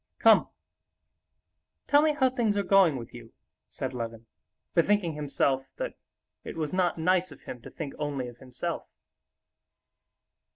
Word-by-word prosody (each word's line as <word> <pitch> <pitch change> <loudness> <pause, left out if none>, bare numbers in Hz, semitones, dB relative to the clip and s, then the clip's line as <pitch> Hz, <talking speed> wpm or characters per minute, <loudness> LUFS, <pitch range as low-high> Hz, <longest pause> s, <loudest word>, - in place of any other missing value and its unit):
"Come, - - +6 1.4
tell 290 0 +6
me 305 -1 +3
how 260 -3 +3
things 225 -5 +1
are 200 - +2
going 190 -6 +5
with 115 -2 -8
you," 120 -2 -11 0.4
said - - -4
Levin, 115 -2 -5 0.5
bethinking 175 -1 +3
himself 140 -2 0
that - - -3 0.5
it - - -7
was 155 0 -2
not 185 -2 +1
nice 180 +2 +2
of - - -13
him 125 - -8
to - - -10
think 145 -4 -6
only 140 -4 -2
of 120 -1 -10
himself. 125 -1 -5
155 Hz, 140 wpm, -28 LUFS, 130-195 Hz, 1.4 s, Come